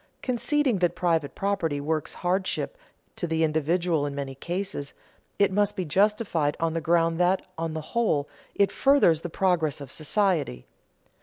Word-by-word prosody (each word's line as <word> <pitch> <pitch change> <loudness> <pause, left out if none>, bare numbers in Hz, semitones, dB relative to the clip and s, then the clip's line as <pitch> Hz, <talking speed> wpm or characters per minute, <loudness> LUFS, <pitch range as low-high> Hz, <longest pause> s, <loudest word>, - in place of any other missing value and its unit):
Conceding 255 -2 +1
that 175 -1 +1
private 165 -5 0
property 185 -7 -1
works 155 +1 -2
hardship 190 - 0 0.4
to 175 - -3
the 160 0 +1
individual 160 +1 +1
in 140 - -5
many 140 -1 -4
cases, 170 0 -5 0.4
it 200 -1 +3
must 205 +1 +1
be 185 -3 -2
justified 190 -3 +1
on 165 -1 0
the 165 - -1
ground 165 0 +2
that, 180 +2 +2
on 165 -1 -3
the 160 - -3
whole, 180 -12 +1 0.3
it 200 -1 +3
furthers 270 - +4
the 175 - -5
progress 165 -5 +1
of 140 -3 -9
society. 155 - 0
170 Hz, 155 wpm, -26 LUFS, 155-195 Hz, 0.4 s, furthers